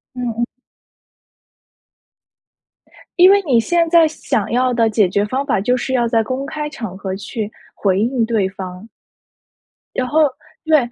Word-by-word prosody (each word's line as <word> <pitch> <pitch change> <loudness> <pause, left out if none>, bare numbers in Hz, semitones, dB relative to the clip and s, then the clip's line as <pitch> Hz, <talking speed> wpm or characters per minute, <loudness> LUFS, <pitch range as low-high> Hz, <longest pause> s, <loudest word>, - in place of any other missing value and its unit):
嗯 250 - -5 0.2
嗯。 240 - +1 2.7
因 360 +1 +8
为 400 0 +4
你 260 -7 +3
现 335 +7 +1
在 335 -1 +6
想 265 -8 -2
要 250 +1 +2
的 230 -2 +2
解 215 -3 +2
决 200 +3 +1
方 260 +6 -2
法 270 -8 0
就 245 +5 +1
是 255 +1 -3
要 240 -2 +2
在 230 -1 +2
公 260 +5 -4
开 300 0 -4
场 225 -11 -7
合 190 -1 -4
去 210 +1 -5 0.2
回 190 -2 +1
应 235 +2 +1
对 220 -4 0
方。 190 +1 -8 1.1
然 255 - 0
后 315 +3 +3 0.4
对， 315 -1 +5
240 Hz, 165 characters per minute, -18 LUFS, 210-280 Hz, 2.7 s, 因